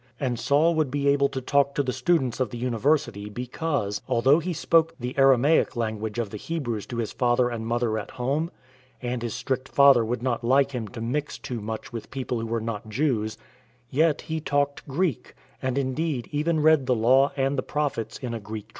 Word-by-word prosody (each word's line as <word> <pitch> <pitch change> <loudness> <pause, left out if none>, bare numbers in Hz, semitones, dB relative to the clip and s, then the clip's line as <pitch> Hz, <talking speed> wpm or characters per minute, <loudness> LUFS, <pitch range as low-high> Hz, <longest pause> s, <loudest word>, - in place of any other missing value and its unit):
And 125 -4 -1
Saul 155 +4 +3
would 155 -4 +1
be 140 +1 -1
able 140 0 +3
to 135 -1 -4
talk 140 +1 +2
to 145 - +1
the 125 -1 -2
students 135 -9 +1
of 130 -4 0
the 120 - -7
University 120 -2 0
because 120 -2 -2
— - - -34
although 130 +5 +4
he 175 +2 -3
spoke 165 0 +2
the 125 +1 -4
Aramaic 135 +2 +4
language 110 -1 -3
of 115 -4 -2
the 105 - -5
Hebrews 120 -6 -4
to 120 - -5
his 115 -2 -2
father 120 0 +2
and 115 -2 -4
mother 115 -2 0
at 105 - -7
home, 140 +7 -1 0.5
and 125 -1 -3
his 120 -1 -3
strict 130 +2 -3
father 140 -4 +6
would 120 +1 -3
not 125 -2 -1
like 135 +3 +3
him 120 -5 -4
to 115 +2 -8
mix 140 +6 -2
too 120 -3 -5
much 110 +4 -6
with 115 - -6
people 130 -2 -3
who 115 - -4
were 115 +1 -1
not 110 -1 -5
Jews 110 -4 0 0.3
— 120 +1 -36
yet 155 +2 +2
he 160 0 -3
talked 145 0 -1
Greek, 150 - -2 0.3
and 130 0 -1
indeed, 140 0 -1
even 155 +2 +1
read 155 -4 +4
the 125 - +3
Law 130 +5 +4
and 135 +1 +1
the 130 - 0
Prophets 140 -7 -2
in 125 -3 -5
a 115 - -3
Greek 105 +1 -7
translation. 110 - -33
130 Hz, 215 wpm, -25 LUFS, 115-145 Hz, 0.5 s, father